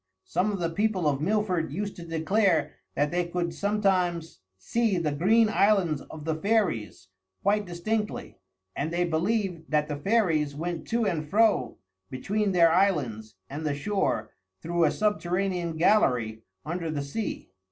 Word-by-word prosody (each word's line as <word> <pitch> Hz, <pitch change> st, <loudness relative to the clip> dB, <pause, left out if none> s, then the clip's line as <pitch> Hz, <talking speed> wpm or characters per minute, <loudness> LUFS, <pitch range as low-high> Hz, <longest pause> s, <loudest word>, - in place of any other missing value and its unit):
Some 185 Hz, +5 st, 0 dB
of 200 Hz, -, -2 dB
the 170 Hz, -1 st, -1 dB
people 195 Hz, -2 st, 0 dB
of 140 Hz, -1 st, 0 dB
Milford 185 Hz, -4 st, 0 dB
used 200 Hz, +6 st, -4 dB
to 170 Hz, -, -8 dB
declare 165 Hz, +1 st, +1 dB, 0.2 s
that 145 Hz, +1 st, +1 dB
they 175 Hz, 0 st, +1 dB
could 170 Hz, -1 st, -2 dB
sometimes 185 Hz, -, 0 dB, 0.2 s
see 220 Hz, -, 0 dB
the 160 Hz, -3 st, 0 dB
Green 210 Hz, +10 st, +4 dB
Islands 195 Hz, -8 st, +2 dB
of 150 Hz, -1 st, -9 dB
the 160 Hz, -, 0 dB
fairies 160 Hz, -, -1 dB, 0.3 s
quite 205 Hz, 0 st, +2 dB
distinctly; 210 Hz, +5 st, -3 dB, 0.4 s
and 150 Hz, -, -2 dB
they 175 Hz, +1 st, +1 dB
believed 175 Hz, 0 st, -1 dB
that 150 Hz, -1 st, +1 dB
the 150 Hz, -, -3 dB
fairies 160 Hz, -6 st, +1 dB
went 170 Hz, +3 st, -4 dB
to 230 Hz, -1 st, 0 dB
and 155 Hz, -6 st, -2 dB
fro 205 Hz, -, +2 dB, 0.3 s
between 200 Hz, +10 st, -1 dB
their 170 Hz, -3 st, +5 dB
islands 140 Hz, -, +1 dB
and 145 Hz, +3 st, -6 dB
the 150 Hz, -2 st, -1 dB
shore 145 Hz, -, -1 dB, 0.3 s
through 170 Hz, 0 st, +1 dB
a 150 Hz, -, +3 dB
subterranean 180 Hz, -4 st, -1 dB
gallery 125 Hz, -, +2 dB, 0.2 s
under 170 Hz, +1 st, -3 dB
the 145 Hz, -2 st, -2 dB
sea. 140 Hz, -, -5 dB
175 Hz, 150 wpm, -27 LUFS, 155-205 Hz, 0.4 s, their